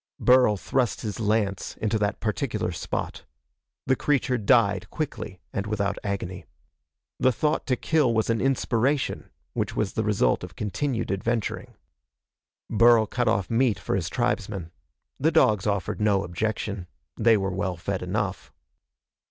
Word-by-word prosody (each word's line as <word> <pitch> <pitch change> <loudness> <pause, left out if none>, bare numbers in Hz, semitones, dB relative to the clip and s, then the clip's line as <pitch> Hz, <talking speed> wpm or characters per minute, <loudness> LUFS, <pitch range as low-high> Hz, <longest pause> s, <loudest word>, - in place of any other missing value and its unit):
Burl 125 -4 +5
thrust 125 +4 0
his 105 -2 -4
lance 105 -3 0
into 110 0 0
that 105 0 -1
particular 105 -2 -1
spot. 85 - -4 0.6
The 130 - +3
creature 130 -3 +1
died 100 -3 +3
quickly 110 - -5
and 100 +1 -2
without 100 -1 -1
agony. 95 -3 -4 0.7
The 130 - +4
thought 150 +5 0
to 130 - +2
kill 150 -1 +2
was 110 -1 +1
an 115 -1 +1
inspiration, 135 +1 0 0.2
which - - -2
was 105 -3 -1
the 110 - 0
result 100 - +2
of - - -8
continued 115 +2 -2
adventuring. 110 +3 -2 0.9
Burl 115 0 +5
cut 120 +3 -1
off 105 -4 +1
meat 115 -4 +2
for 85 - -2
his 85 -4 -1
tribesmen. 105 -7 -2 0.5
The 160 +4 +3
dogs 110 - +3
offered 100 0 -1
no 100 -2 +3
objection. 100 0 -3 0.3
They 115 -1 +5
were 95 -1 -2
well 95 -2 -2
fed 95 +3 -3
enough. 95 +1 -3
110 Hz, 145 wpm, -26 LUFS, 100-120 Hz, 0.9 s, Burl